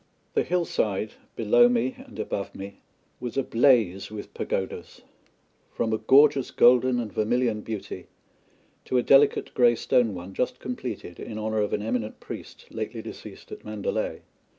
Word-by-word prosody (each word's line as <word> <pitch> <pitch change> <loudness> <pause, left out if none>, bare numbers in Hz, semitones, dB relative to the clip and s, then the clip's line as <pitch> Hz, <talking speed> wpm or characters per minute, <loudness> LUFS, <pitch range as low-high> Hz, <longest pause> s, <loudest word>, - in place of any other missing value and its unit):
The - - +2
hillside 110 - -1 0.2
below 120 +2 +5
me 125 +1 +1
and - - -13
above - - -4
me 100 0 -9 0.4
was 125 +1 -5
ablaze 115 -7 +3
with 105 -1 -8
pagodas 95 - -4 0.7
from 110 -1 0
a 110 - 0
gorgeous 135 +3 +5
golden 125 0 +4
and 110 -4 -4
vermilion 110 0 +1
beauty 110 -3 -6 0.8
to 130 - 0
a 125 - +2
delicate 140 +1 +4
grey 120 -1 +5
stone 115 -3 +1
one 90 +2 -8
just 125 - -1
completed 120 -8 -6
in 110 - -6
honour 110 0 -1
of 105 - -1
an 105 - -1
eminent 110 -1 -3
priest - - -9
lately - - -5
deceased - - -10
at - - -9
Mandalay. 105 -1 -3
115 Hz, 150 wpm, -26 LUFS, 105-125 Hz, 0.8 s, below